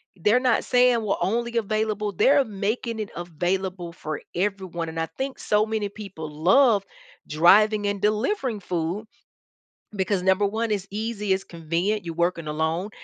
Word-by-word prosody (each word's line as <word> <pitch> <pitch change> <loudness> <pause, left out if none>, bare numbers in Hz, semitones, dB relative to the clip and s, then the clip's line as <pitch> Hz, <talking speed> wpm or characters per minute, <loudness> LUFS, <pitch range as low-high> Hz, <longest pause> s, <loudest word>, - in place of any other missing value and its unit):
they're 210 +7 +3
not 250 -3 +2
saying 245 -2 +4
we're 210 -2 0
only 235 +3 -1
available 215 -1 -1
They're 275 - +4
making 220 +3 -3
it 210 - -4
available 175 +1 -3
for 155 -2 -6
everyone, 185 -3 -2
and 165 0 -5
I 165 - -1
think 265 0 -4
so 210 +1 +2
many 215 -2 -2
people 195 -7 -8
love 200 - +4 0.4
driving 205 +7 +4
and 200 -1 -1
delivering 220 - 0
food 180 +3 -3 0.9
because 190 -1 0
number 190 +2 +3
one 220 +2 -1
it's 195 -2 -2
easy, 210 -1 -3
it's 190 - -2
convenient, 170 +5 -2
you're 165 -1 -5
working 170 -2 0
alone, 160 +6 -1
200 Hz, 150 wpm, -24 LUFS, 175-220 Hz, 0.9 s, saying